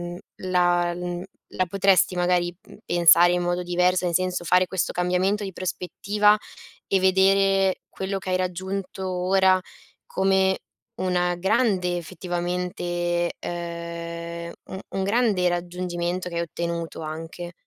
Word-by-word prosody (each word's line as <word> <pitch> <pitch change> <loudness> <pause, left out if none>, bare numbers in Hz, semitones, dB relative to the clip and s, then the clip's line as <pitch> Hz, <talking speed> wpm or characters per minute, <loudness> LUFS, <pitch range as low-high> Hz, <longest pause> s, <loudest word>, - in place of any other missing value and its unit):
mhmm, - - -8 0.2
la 175 -1 +1
l 180 - -5
mhmm, 175 0 -4 0.3
la 185 - 0
potresti 195 0 +3
magari 175 0 +1 0.3
pensare 175 0 +6
in 180 - +1
modo 175 0 0
diverso, 180 +1 +2
nel 175 - -1
senso, 185 0 0
fare 180 +2 +4
questo 185 -2 -1
cambiamento 180 +4 0
di 190 - -6
prospettiva 205 +4 +1 0.5
e 195 - +2
vedere 195 0 +3
quello 190 +1 -3
che 190 -1 -5
hai 185 - +2
raggiunto 190 +1 -4
ora 185 +1 +3 0.5
come 190 0 +2 0.4
una 180 -1 0
grande 185 -2 +1
effettivamente 175 0 -2
ehm, 170 0 -6
u 190 - -7
un 195 - -2
grande 205 -3 +2
raggiungimento 175 0 -3
che 170 - -7
hai - - +1
ottenuto 170 0 -4
anche. 165 +3 -7
180 Hz, 130 wpm, -24 LUFS, 175-190 Hz, 0.5 s, pensare